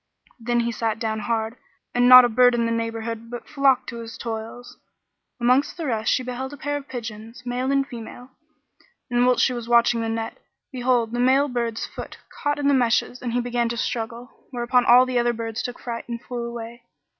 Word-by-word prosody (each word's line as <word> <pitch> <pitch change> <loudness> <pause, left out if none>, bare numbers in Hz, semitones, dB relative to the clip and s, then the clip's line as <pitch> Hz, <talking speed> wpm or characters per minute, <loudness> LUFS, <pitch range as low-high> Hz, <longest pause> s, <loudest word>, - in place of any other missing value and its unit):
Then 240 +1 0
he 235 0 -1
sat 225 -1 -2
down 220 -1 -2
hard 220 +1 -2
by, - - -27 0.3
and 245 0 +4
not 255 0 +11
a - - +3
bird 245 +1 +4
in 235 -1 +1
the 230 - -1
neighbourhood 230 0 -3
but 240 0 -8
flocked 270 -3 +2
to 235 - -7
his 230 0 -8
toils. 230 +1 -7 0.6
Amongst 250 +7 +2
the 330 - -4
rest 225 -5 0
she 255 - +1
beheld 255 +2 -5
a - - -9
pair 290 +1 -3
of 285 -1 -6
pigeons, 230 0 -7
male 250 +2 -1
and 275 0 +2
female; 245 +1 -10 0.8
and, 245 +1 +3
whilst 250 -1 +4
she 255 - 0
was 240 -1 -6
watching 235 0 +4
the 225 - -2
net, 225 0 -4 0.3
behold, 245 -3 +1
the 240 - -3
male 265 +3 +4
bird's 235 -2 -2
foot - - -9 0.2
caught 290 0 0
in 290 -1 0
the 285 - +4
meshes 245 -1 +1
and 240 -2 -3
he 245 - +1
began 240 -1 -1
to 235 - -3
struggle; 235 +2 -5
whereupon 245 -1 +1
all 250 +1 +7
the 255 -1 0
other 240 0 +1
birds 225 -1 -4
took 245 - -5
fright 235 0 -6
and 235 0 -5
flew 240 -1 -5
away. 235 0 -8
240 Hz, 215 wpm, -23 LUFS, 230-250 Hz, 0.8 s, not